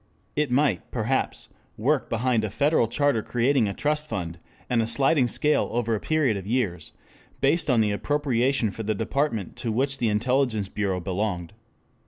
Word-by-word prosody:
It 150 -2 +1
might, 140 +4 +1
perhaps, 125 +2 -1 0.3
work 135 +6 +1
behind 115 -1 +1
a 110 - -1
federal 145 +1 +2
charter 140 0 +1
creating 120 +1 +1
a 100 - -2
trust 150 +1 0
fund, 85 -6 -4 0.3
and 120 -2 +2
a 110 - -1
sliding 135 +2 +3
scale 150 +5 +1
over 115 -1 0
a 110 - 0
period 145 -8 +1
of 95 0 -7
years 105 -9 -2 0.5
based 150 +3 +2
on 120 -4 +4
the 105 -1 +1
appropriation 130 -1 0
for 105 - -7
the 110 0 -1
department 115 - -1
to 115 - -2
which 135 +4 -1
the 115 - +1
intelligence 110 -1 +1
bureau 95 -3 -1
belonged. 90 -1 -3
120 Hz, 170 wpm, -25 LUFS, 105-140 Hz, 0.5 s, on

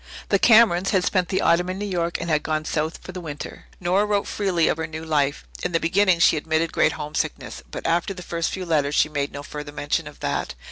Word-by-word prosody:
The 200 - +3
Camerons 210 -6 +5
had 190 -3 +2
spent 185 -3 +1
the 190 - 0
autumn 175 +2 +3
in 185 - -3
New 205 - -3
York 170 -3 -1
and - - -4
had 155 -2 +2
then 155 - -4
gone 155 0 0
south 160 +1 -2
for - - -8
the 180 0 -7
winter. 150 -3 -7
Nora 185 +3 +2
wrote 205 -1 +1
freely 185 -5 +1
of - - +1
her 160 -1 -3
new 160 0 -7
life. 145 -2 0 0.2
In 180 - -2
the 165 - +3
beginning 185 +2 +3
she 165 -1 +4
admitted 160 +2 0
great - - +3
homesickness, 150 0 -4
but - - -7
after 170 +3 +1
the 180 -2 -7
first 170 -1 -2
few 185 -1 -5
letters 150 -3 +1
she - - +3
made 145 -2 -2
no 145 0 -7
further 150 0 -7
mention 145 0 -2
of - - -12
that. - - -2
170 Hz, 245 wpm, -23 LUFS, 155-185 Hz, 0.2 s, Camerons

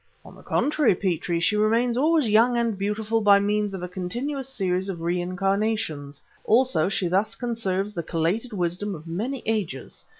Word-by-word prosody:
"On - - -12
the - - -15
contrary, 295 -8 +2
Petrie, 175 -2 -1
she 210 +5 +2
remains 230 +3 +2
always 305 +1 +3
young 230 +3 +4
and 235 -2 0
beautiful 210 +3 -1
by 200 -1 +6
means 205 0 0
of 180 - -6
a - - -3
continuous 245 +10 -4
series 190 -5 -1
of 170 -4 -5
reincarnations; 180 -4 -1 0.2
also 220 -8 +3
she 190 -2 -1
thus 195 +5 +1
conserves 210 -5 -2
the 170 - -3
collated 170 +9 -1
wisdom 185 +1 -2
of 155 0 -11
many 225 +11 -4
ages. 205 -11 -3
205 Hz, 165 wpm, -25 LUFS, 180-230 Hz, 0.2 s, by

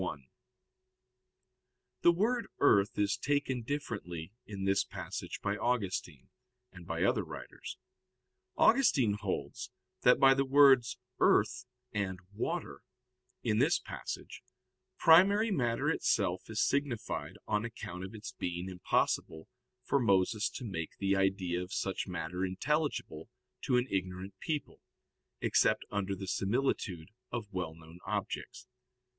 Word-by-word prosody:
1: 70 -3 -4 1.8
The 170 - +7
word 230 +7 0
earth 100 0 +4
is 100 -1 +2
taken 140 -3 0
differently 100 - -5
in 100 -2 -5
this 100 0 +3
passage - - -6
by 100 0 0
Augustine, 95 - -2 0.4
and 90 -2 -12
by - - -1
other - - +2
writers. - - -8 0.8
Augustine 140 - +4
holds 105 - -4 0.3
that - - +5
by 135 0 +7
the 135 0 +2
words 135 -3 +5 0.2
"earth" 110 +3 +3 0.3
and 100 -3 -1 0.2
"water," 70 -7 -3 0.6
in 110 -2 +1
this 150 +7 +4
passage, - - -7 0.6
primary 200 +7 +6
matter 120 -9 0
itself - - +1
is - - +1
signified 140 -5 -2
on 105 +1 +1
account 95 -6 -6
of 95 +4 -7
its 110 - -7
being 90 +1 -4
impossible 90 -1 -1 0.4
for 140 - +2
Moses 105 -1 +2
to 130 - -7
make 85 -7 -5
the 100 0 +1
idea 95 -2 +1
of 90 +1 -7
such 95 0 -2
matter 90 0 -3
intelligible 120 - -1 0.4
to 125 - +3
an 125 - +2
ignorant 95 0 -3
people, 150 -3 -4 0.6
except - - +3
under 100 -1 -1
the 95 0 -7
similitude 95 -5 -1 0.2
of 110 -4 -5
well 90 -4 -3
known 80 +1 -14
objects. - - -4
105 Hz, 125 wpm, -32 LUFS, 95-130 Hz, 1.8 s, The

